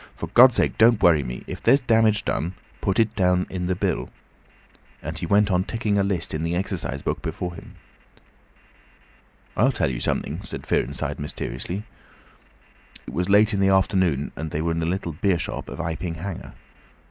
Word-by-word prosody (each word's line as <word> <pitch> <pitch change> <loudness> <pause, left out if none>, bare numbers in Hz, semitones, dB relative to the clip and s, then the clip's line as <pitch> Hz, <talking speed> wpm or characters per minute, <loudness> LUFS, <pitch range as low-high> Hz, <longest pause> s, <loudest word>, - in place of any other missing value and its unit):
"For - - -5
God's 125 0 +7
sake - - +1
don't 115 -1 +5
worry 80 -4 +6
me. 60 -2 -6
If - - -7
there's 140 - +5
damage 110 -4 +3
done, 90 +4 -2 0.3
put 95 +3 0
it 110 -1 +2
down 90 -1 +2
in 90 -1 -3
the 95 - 0
bill," - - -1 0.9
and 80 +1 -5
he 85 - -3
went 100 +2 +3
on 90 0 +2
ticking 105 -1 -1
a - - +3
list 95 -3 -1
in 75 - -2
the 85 +1 -1
exercise 90 - -3
book - - -2
before 90 -1 -4
him. - - -12 1.8
"I'll 125 +7 +4
tell 110 - 0
you - - -4
something," 80 +7 -2
said 95 - -8
Fearenside, - - -1
mysteriously. 90 +6 -5 1.2
It - - -9
was 90 +5 -1
late 105 +2 +5
in 100 - 0
the 95 0 +3
afternoon, 95 -6 +2
and 80 0 -5
they 75 - -3
were 85 - 0
in 80 - -1
the 80 - -1
little 90 -2 -2
beer 90 +3 +1
shop 85 - -5
of - - -7
Iping 85 0 -3
Hanger. 90 +2 -7
90 Hz, 185 wpm, -24 LUFS, 85-100 Hz, 1.8 s, God's